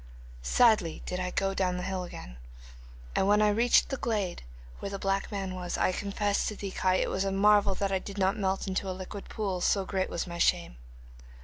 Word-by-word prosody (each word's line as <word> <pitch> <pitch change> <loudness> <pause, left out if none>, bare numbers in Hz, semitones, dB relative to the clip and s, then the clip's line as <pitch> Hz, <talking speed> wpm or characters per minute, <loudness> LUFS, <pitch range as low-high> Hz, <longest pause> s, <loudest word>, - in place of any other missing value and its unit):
'Sadly 210 - +3
did 180 - -3
I 180 0 -2
go 195 +1 0
down 185 -2 0
the 180 - -4
hill 190 -1 -2
again, - - -9 0.8
and 190 - +2
when 205 +1 +5
I 210 0 +4
reached 235 +4 +4
the 270 - -2
glade 210 -8 -2 0.4
where - - -4
the 200 - -4
black 195 +1 -1
man 195 -2 -3
was, 180 -1 -4
I - - +2
confess 200 +1 -1
to 210 - -3
thee, 200 -1 -5
Kai, 185 0 +1
it - - 0
was 190 - 0
a 195 - -1
marvel 200 0 +4
that 200 0 -1
I 190 - +1
did 200 +1 -9
not 190 0 +2
melt 190 -2 -1
into 190 0 -2
a 185 - -4
liquid 195 +2 -8
pool, 195 -4 -2
so 195 +1 +2
great 190 -1 -1
was 170 - -2
my 170 -1 -7
shame. - - +1
195 Hz, 220 wpm, -29 LUFS, 185-205 Hz, 0.8 s, when